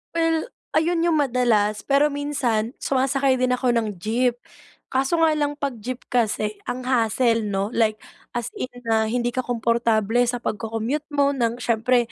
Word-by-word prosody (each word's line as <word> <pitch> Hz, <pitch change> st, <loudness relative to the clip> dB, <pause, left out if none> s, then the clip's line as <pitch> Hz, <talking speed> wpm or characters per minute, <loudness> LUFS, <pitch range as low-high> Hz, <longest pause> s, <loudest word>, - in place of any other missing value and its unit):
Well, 330 Hz, -1 st, +2 dB, 0.3 s
ayun 330 Hz, +2 st, +2 dB
'yung 330 Hz, -, +3 dB
madalas, 235 Hz, -7 st, +1 dB
pero 285 Hz, +1 st, +3 dB
minsan 260 Hz, -5 st, -1 dB
sumasakay 270 Hz, -1 st, +2 dB
din 250 Hz, 0 st, +2 dB
ako 250 Hz, 0 st, +1 dB
ng 220 Hz, -4 st, -1 dB
jeep. 235 Hz, +6 st, 0 dB, 0.6 s
Kaso 270 Hz, +5 st, +1 dB
nga 320 Hz, -, +5 dB
lang, 290 Hz, -1 st, 0 dB
'pag 275 Hz, -5 st, -4 dB
jeep 250 Hz, +4 st, -6 dB
kasi, 215 Hz, -3 st, 0 dB
ang 250 Hz, +1 st, -3 dB
hassle 230 Hz, -2 st, +2 dB
'no. 200 Hz, +2 st, -1 dB
Like, 220 Hz, -3 st, +2 dB, 0.4 s
as 240 Hz, 0 st, -2 dB
in -, -, -2 dB, 0.2 s
na 220 Hz, -1 st, +1 dB
hindi 240 Hz, +1 st, 0 dB
ka 255 Hz, -, -3 dB
komportable 230 Hz, -2 st, +1 dB
sa 245 Hz, 0 st, -2 dB
pagco-commute 225 Hz, +7 st, -2 dB
mo 280 Hz, 0 st, +3 dB
ng 235 Hz, -4 st, 0 dB
siyempre 235 Hz, +1 st, +2 dB
245 Hz, 160 wpm, -23 LUFS, 225-275 Hz, 0.6 s, nga